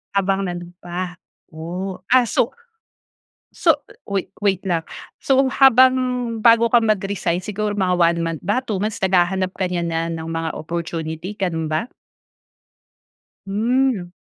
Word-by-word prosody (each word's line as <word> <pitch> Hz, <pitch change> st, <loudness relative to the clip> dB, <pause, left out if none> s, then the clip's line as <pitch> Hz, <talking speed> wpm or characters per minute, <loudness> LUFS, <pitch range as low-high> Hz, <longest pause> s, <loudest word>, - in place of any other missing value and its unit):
Habang 195 Hz, 0 st, +1 dB
nando'n 175 Hz, 0 st, -6 dB
pa. 180 Hz, +1 st, -4 dB, 0.4 s
Oh, 180 Hz, +4 st, -5 dB
ah, 255 Hz, 0 st, +6 dB
so 230 Hz, +4 st, +1 dB, 1.0 s
so, 325 Hz, -4 st, +3 dB, 0.3 s
wait 195 Hz, -1 st, -2 dB
wait 195 Hz, -2 st, +1 dB
lang. 170 Hz, -3 st, 0 dB, 0.4 s
So, 270 Hz, 0 st, +3 dB
habang 260 Hz, -1 st, +6 dB, 0.5 s
bago 230 Hz, 0 st, +6 dB
ka 240 Hz, -1 st, +5 dB
mag-resign 195 Hz, -5 st, 0 dB
siguro 210 Hz, +2 st, -3 dB
mga 185 Hz, -2 st, +2 dB
1 170 Hz, -1 st, +3 dB
month 165 Hz, -2 st, -3 dB
ba, 205 Hz, +7 st, +1 dB
2 210 Hz, -6 st, -3 dB
months, 215 Hz, 0 st, -2 dB
naghahanap 185 Hz, 0 st, +1 dB
ka 190 Hz, -, -1 dB
niya 175 Hz, -1 st, -1 dB
na 165 Hz, -1 st, -1 dB
ng 160 Hz, -1 st, -5 dB
mga 165 Hz, 0 st, -2 dB
opportunity 165 Hz, +3 st, -5 dB
ganun 165 Hz, -5 st, -2 dB
ba? 155 Hz, +7 st, 0 dB, 1.6 s
Hmm. 220 Hz, -2 st, 0 dB
190 Hz, 135 wpm, -21 LUFS, 170-215 Hz, 1.6 s, ah